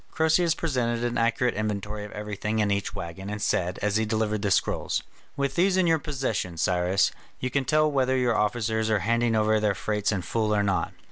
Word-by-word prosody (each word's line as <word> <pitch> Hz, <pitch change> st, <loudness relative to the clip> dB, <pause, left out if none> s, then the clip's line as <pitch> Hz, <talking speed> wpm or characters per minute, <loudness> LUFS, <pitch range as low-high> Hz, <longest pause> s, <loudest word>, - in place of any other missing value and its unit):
Croesus 160 Hz, +1 st, +2 dB
presented 120 Hz, -7 st, -1 dB
an 120 Hz, 0 st, -1 dB
accurate 115 Hz, +1 st, +1 dB
inventory 105 Hz, 0 st, -3 dB
of 105 Hz, -, -8 dB
everything 105 Hz, +1 st, -3 dB
in 105 Hz, -2 st, +2 dB
each 100 Hz, 0 st, -2 dB
waggon, 90 Hz, +4 st, -6 dB
and 105 Hz, 0 st, -4 dB
said, 90 Hz, -2 st, 0 dB
as 105 Hz, 0 st, +2 dB
he 110 Hz, -, +1 dB
delivered 110 Hz, -1 st, -1 dB
the 105 Hz, -, 0 dB
scrolls: 95 Hz, -, 0 dB, 0.3 s
"With 140 Hz, -1 st, 0 dB
these 185 Hz, +3 st, +2 dB
in 185 Hz, -, +3 dB
your 165 Hz, -1 st, +3 dB
possession, 130 Hz, -, -3 dB
Cyrus, 90 Hz, +3 st, +2 dB, 0.3 s
you 130 Hz, -, -3 dB
can 140 Hz, -1 st, 0 dB
tell 155 Hz, +2 st, +3 dB
whether 130 Hz, -1 st, +2 dB
your 125 Hz, -2 st, +2 dB
officers 110 Hz, 0 st, 0 dB
are 110 Hz, -, +3 dB
handing 115 Hz, 0 st, +2 dB
over 110 Hz, 0 st, +3 dB
their 105 Hz, -2 st, +1 dB
freights 105 Hz, +5 st, -1 dB
in 95 Hz, -4 st, -2 dB
full 105 Hz, +3 st, 0 dB
or 105 Hz, -, +2 dB
not." 100 Hz, -2 st, 0 dB
110 Hz, 205 wpm, -26 LUFS, 105-125 Hz, 0.3 s, in